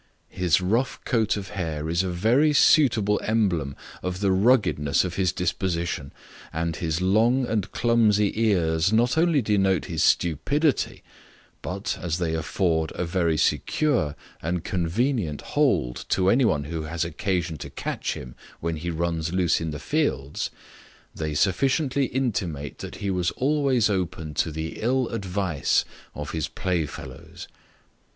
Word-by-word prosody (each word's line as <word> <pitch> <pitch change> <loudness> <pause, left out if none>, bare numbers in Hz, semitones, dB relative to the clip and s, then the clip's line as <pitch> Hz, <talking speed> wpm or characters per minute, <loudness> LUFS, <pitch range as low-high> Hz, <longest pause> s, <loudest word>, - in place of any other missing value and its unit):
His 90 -3 +2
rough 115 +8 0
coat 110 -4 +1
of 95 -2 -6
hair 80 -6 -3
is 85 +2 +1
a 95 - -2
very 120 - +3
suitable 115 -10 +4
emblem 90 -11 0 0.3
of 90 0 -3
the 100 -1 +2
ruggedness 95 - +3
of 90 - -4
his 90 0 +1
disposition; 85 -5 -2 0.4
and 80 0 -2
his 80 0 -2
long 115 +7 +3
and 110 -4 -2
clumsy 110 -4 +3
ears 85 -5 +2
not 120 +4 +3
only 160 -4 +3
denotes 95 -4 +2
his 80 -2 0
stupidity, 140 - +1 0.6
but, - - -4
as 85 -1 -1
they 85 -3 -1
afford 80 0 0
a 90 - -2
very 85 -2 +1
secure 125 - +1 0.3
and 85 +1 -2
convenient 90 - -1
hold - - +1
to 95 0 +3
any 130 +1 +4
one 75 -9 +1
who 80 +2 -4
has 80 +2 -2
occasion 85 -2 -2
to - - -7
catch - - -3
him 60 -1 -8 0.3
when 85 -1 -2
he 85 +3 -4
runs 85 -1 -2
loose 90 -3 +2
in 80 - -2
the 75 - -4
fields, 105 - -1 0.6
they 80 -2 -3
sufficiently 135 - +2
intimate 95 - -2
that - - -7
he 100 - +1
was 90 -1 +1
always 135 -5 +2
open 90 -6 -2
to 80 - 0
the 80 +1 -5
ill 125 +2 +1
advice 95 - 0 0.3
of 75 0 -5
his 80 -3 -2
play 90 -4 -1
fellows. 80 +6 -10
90 Hz, 145 wpm, -25 LUFS, 80-110 Hz, 0.6 s, suitable